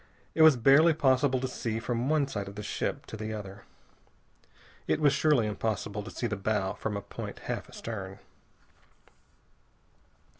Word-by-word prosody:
It 160 Hz, -, +1 dB
was 160 Hz, -4 st, +8 dB
barely 145 Hz, +7 st, +6 dB
possible 130 Hz, -2 st, +3 dB
to 130 Hz, -, -2 dB
see 115 Hz, -3 st, -3 dB
from 120 Hz, +3 st, -2 dB
one 155 Hz, -3 st, +2 dB
side 105 Hz, -7 st, -4 dB
of 100 Hz, -, -9 dB
the 105 Hz, -, -6 dB
ship -, -, -3 dB
to -, -, -8 dB
the 110 Hz, 0 st, -4 dB
other. 100 Hz, -1 st, -9 dB, 1.2 s
It -, -, +1 dB
was 145 Hz, -2 st, +4 dB
surely 145 Hz, -5 st, +3 dB
impossible 105 Hz, 0 st, -2 dB
to 105 Hz, -, -8 dB
see 120 Hz, -, -4 dB
the 110 Hz, -2 st, -1 dB
bow 100 Hz, -1 st, -1 dB
from 105 Hz, -2 st, -3 dB
a -, -, -4 dB
point -, -, -7 dB
half -, -, -4 dB
astern. -, -, -6 dB
115 Hz, 160 wpm, -29 LUFS, 105-135 Hz, 1.2 s, was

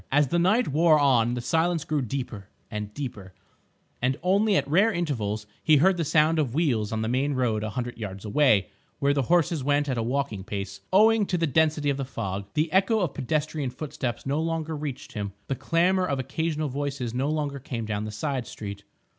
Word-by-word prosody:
As 145 Hz, -1 st, +3 dB
the 170 Hz, -, +2 dB
night 210 Hz, +8 st, +3 dB
wore 155 Hz, +2 st, +5 dB
on 125 Hz, -5 st, +3 dB
the 120 Hz, -, -3 dB
silence 165 Hz, +4 st, +1 dB
grew 150 Hz, -2 st, 0 dB
deeper 120 Hz, -5 st, -5 dB, 0.2 s
and 105 Hz, -1 st, -4 dB
deeper, 105 Hz, -8 st, -7 dB, 0.7 s
and 130 Hz, +2 st, +1 dB
only 200 Hz, +3 st, +3 dB
at -, -, +1 dB
rare 195 Hz, +10 st, +4 dB
intervals 115 Hz, -, -2 dB, 0.2 s
he 155 Hz, -1 st, +5 dB
heard 185 Hz, +5 st, +4 dB
the 170 Hz, -, 0 dB
sound 155 Hz, +2 st, +3 dB
of 135 Hz, -5 st, -1 dB
wheels 125 Hz, -10 st, +1 dB
on 110 Hz, 0 st, -1 dB
the -, -, -1 dB
main 135 Hz, +4 st, 0 dB
road 115 Hz, -5 st, 0 dB
a 110 Hz, -, -2 dB
hundred 120 Hz, +1 st, -5 dB
yards 100 Hz, -2 st, -6 dB
away, 105 Hz, -4 st, +3 dB, 0.3 s
where 140 Hz, 0 st, +2 dB
the 140 Hz, -, +1 dB
horses 165 Hz, 0 st, +2 dB
went 145 Hz, +1 st, +2 dB
at 130 Hz, -4 st, -1 dB
a -, -, +1 dB
walking 120 Hz, -4 st, -2 dB
pace 100 Hz, -1 st, -5 dB
owing 215 Hz, +1 st, +5 dB
to 180 Hz, -, 0 dB
the 165 Hz, -, +1 dB
density 150 Hz, 0 st, +2 dB
of 135 Hz, -, -2 dB
the 135 Hz, -, -2 dB
fog. 100 Hz, -6 st, -4 dB
The 155 Hz, +1 st, +1 dB
echo 200 Hz, +3 st, +3 dB
of 170 Hz, -6 st, -1 dB
pedestrian 150 Hz, 0 st, -1 dB
footsteps 125 Hz, -3 st, -5 dB
no 140 Hz, +3 st, 0 dB
longer 160 Hz, -1 st, -2 dB
reached 145 Hz, -3 st, -6 dB
him, 100 Hz, -3 st, -4 dB
the -, -, -2 dB
clamour 180 Hz, +6 st, +2 dB
of 140 Hz, -4 st, -1 dB
occasional 150 Hz, +3 st, -2 dB
voices 135 Hz, -3 st, -3 dB
no 130 Hz, +4 st, 0 dB
longer 145 Hz, -2 st, -2 dB
came 120 Hz, -4 st, -5 dB
down 105 Hz, -1 st, -2 dB
the 105 Hz, -, -5 dB
side 130 Hz, +3 st, -3 dB
street. 100 Hz, -1 st, -7 dB
140 Hz, 205 wpm, -26 LUFS, 115-160 Hz, 0.7 s, wore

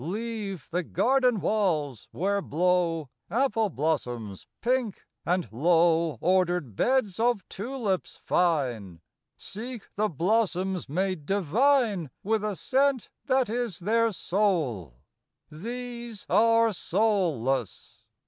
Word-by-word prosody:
Leave 205 Hz, -, -4 dB
the 175 Hz, +2 st, 0 dB
garden 250 Hz, -, +2 dB
walls, 160 Hz, -, 0 dB
where 200 Hz, +3 st, 0 dB
blow 170 Hz, -2 st, +1 dB, 0.2 s
Apple 225 Hz, -3 st, +1 dB
blossoms 125 Hz, -, -3 dB
pink, 245 Hz, -4 st, -1 dB, 0.2 s
and 180 Hz, -2 st, +1 dB
low 165 Hz, +2 st, +3 dB
Ordered 175 Hz, -, +1 dB
beds 235 Hz, -, +1 dB
of 235 Hz, -3 st, +1 dB
tulips 210 Hz, -3 st, -3 dB
fine. 125 Hz, -, 0 dB, 0.4 s
Seek 230 Hz, +2 st, -7 dB
the 215 Hz, +1 st, 0 dB
blossoms 185 Hz, -, 0 dB
made 180 Hz, -1 st, -2 dB
divine 205 Hz, -, +2 dB
With 215 Hz, +1 st, 0 dB
a 210 Hz, -2 st, -1 dB
scent 270 Hz, +3 st, +1 dB, 0.2 s
that 260 Hz, -2 st, +3 dB
is 230 Hz, -4 st, -2 dB
their 230 Hz, +5 st, +2 dB
soul. 150 Hz, -, -1 dB, 0.5 s
These 235 Hz, +4 st, -6 dB
are 230 Hz, 0 st, +4 dB
soulless. 165 Hz, -, -1 dB
190 Hz, 100 wpm, -27 LUFS, 160-230 Hz, 0.5 s, are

